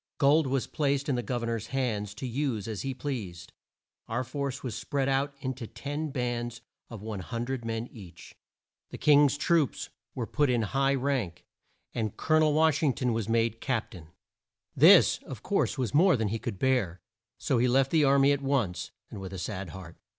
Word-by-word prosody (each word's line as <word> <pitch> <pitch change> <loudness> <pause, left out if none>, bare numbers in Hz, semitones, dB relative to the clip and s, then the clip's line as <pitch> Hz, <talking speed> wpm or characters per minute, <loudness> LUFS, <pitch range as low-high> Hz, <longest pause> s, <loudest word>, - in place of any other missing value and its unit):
Gold 145 +2 +4
was 135 -1 0
placed 140 -1 -1
in - - +2
the 120 - -1
Gov 120 +1 -3
er - - -1
nor's 115 -2 -3
hands 110 -6 -2
to 130 - -6
use 125 -4 -2
as 110 -4 -4
he 135 - -2
pleased. 105 -11 -5 0.5
Our 120 +3 -1
force 140 +1 -4
was 125 -4 -3
spread 140 -2 -2
out 135 +1 0
in 130 0 -2
to 120 -3 -8
ten 145 +5 -4
bands, 120 -3 -3 0.3
of 110 -4 -9
100 115 +5 -4
men 115 0 -3
each. 90 -7 -12 0.6
The - - -8
King's 145 -1 +5
troops 160 -2 +1 0.3
were 125 -4 -2
put 145 +4 +1
in 120 -2 +2
high 135 +5 +1
rank, 125 - -2 0.5
and 110 -4 -3
Col 155 0 +2
o - - +5
nel 155 -1 +3
Wash 155 -1 +3
ing 145 -5 +3
ton 125 -2 -1
was 110 -1 -2
made 115 0 +1
Cap 125 -4 -1
tain. 85 -7 -11 0.7
This, - - +7
of - - -10
course, - - 0
was 130 -2 -2
more 170 +1 +5
than 110 -2 0
he 115 +2 -2
could 100 - -5
bear, 115 -8 +1 0.4
so 125 - 0
he 125 - +3
left 135 +2 +3
the 160 -2 +4
ar 140 0 +5
my 140 +1 +5
at 140 -1 0
once, 100 -11 -1 0.2
and 105 - -7
with 95 0 -7
a - - -5
sad 95 0 -4
heart. 85 -1 -10
125 Hz, 200 wpm, -28 LUFS, 110-140 Hz, 0.7 s, This